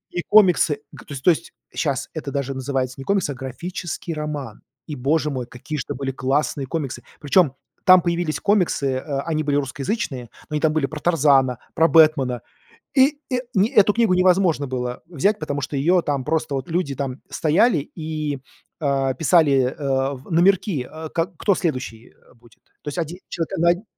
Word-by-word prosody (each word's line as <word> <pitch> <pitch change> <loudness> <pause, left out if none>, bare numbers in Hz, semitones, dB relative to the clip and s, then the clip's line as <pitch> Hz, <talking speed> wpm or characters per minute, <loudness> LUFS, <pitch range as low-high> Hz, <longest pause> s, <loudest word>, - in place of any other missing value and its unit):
И 175 - -3
комиксы, 180 -8 +5
г - - -12
то - - -10
есть 135 -1 -6
то 180 - +7
есть 160 - -1 0.2
щас 140 -5 -1
это 150 -3 -5
даже 140 -1 -2
называется 130 -1 -2
не 135 - -7
комиксы, 195 -7 +1
а - - -7
графический 165 +6 -5
роман. 150 -3 -5 0.2
И 150 - -5
Боже 145 +4 +1
мой! 125 -3 -4
Какие 150 +5 -6
ж - - -1
это - - -5
были 135 +1 -3
классные 135 +1 -1
комиксы, 135 -4 -4 0.2
причем 145 -1 +3 0.3
там 185 0 +8
появились 170 -2 -1
комиксы, 190 -8 +1
э, 135 +1 -3
они 155 -2 0
были 145 -1 0
русскоязычные, 135 - -3 0.2
но 150 - -6
они 150 - 0
там 155 0 +2
были 155 -3 +1
про 155 +1 -8
Тарзана, 140 -7 +3 0.2
про 165 - +4
Бэтмена, 150 -7 +4 0.6
и, 280 +2 +4
э, 250 - +2 0.2
не 200 +4 +3
эту 210 0 +4
книгу 225 -5 +3
невозможно 180 -5 +3
было 125 -1 -4
взять, 195 +6 0
потому 145 0 -3
что 145 0 -3
её 175 +5 +3
там 140 -4 -2
просто 155 -2 -1
вот 135 +4 -4
люди 165 -4 -1
там 135 -2 -4
стояли 170 +6 +3 0.2
и, 155 -3 -3 0.4
э, 135 -2 +1
писали, 145 -6 +3
э, 135 -1 -1
номерки, 175 - +2
э, 160 0 -7
к 165 +1 +1
кто 200 -3 +2
следующий 130 -8 -4 0.2
будет. 115 -1 -22 0.2
То 145 - -4
есть 145 - -7
один 170 +2 -3
человек 165 -2 -3
на 170 +1 +4
день, 185 - -12
150 Hz, 185 wpm, -22 LUFS, 135-170 Hz, 0.6 s, там